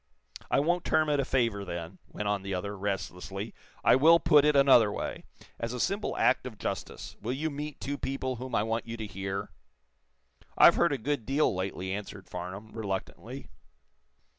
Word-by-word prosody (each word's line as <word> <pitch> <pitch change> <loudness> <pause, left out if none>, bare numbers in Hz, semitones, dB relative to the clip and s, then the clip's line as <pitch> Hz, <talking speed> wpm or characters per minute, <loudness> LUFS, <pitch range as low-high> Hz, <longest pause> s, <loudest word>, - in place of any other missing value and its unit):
"I - - +3
won't 175 +4 +1
term 155 -1 +2
it 145 -1 +2
a 135 - +1
favor, 115 -7 +1
then," 85 0 -6
went 105 - -5
on 100 -1 0
the 95 0 -3
other, 100 +3 -4
restlessly. 95 +1 -4 0.3
"I - - +6
will 165 +5 +7
put 150 -3 +5
it 150 -1 +4
another 130 -6 +6
way. - - -5 0.3
As 115 +1 -3
a 125 - -4
simple 200 - -1
act 130 - +3
of 115 -4 -9
justice - - -5
will 115 +4 -2
you 155 +4 -2
meet 150 +1 -6
two 140 +1 -4
people 130 -2 -2
whom 125 0 -5
I 105 - +3
want 115 +1 -2
you 115 0 -5
to 110 - -4
hear?" 100 0 -4 1.1
"I've - - +9
heard - - +3
a - - 0
good 140 0 -2
deal, 140 -1 +2
lately," 95 0 -3
answered 100 -1 -7
Farnum, 95 +5 -7
reluctantly. 100 -4 -5
115 Hz, 185 wpm, -29 LUFS, 100-140 Hz, 1.1 s, I've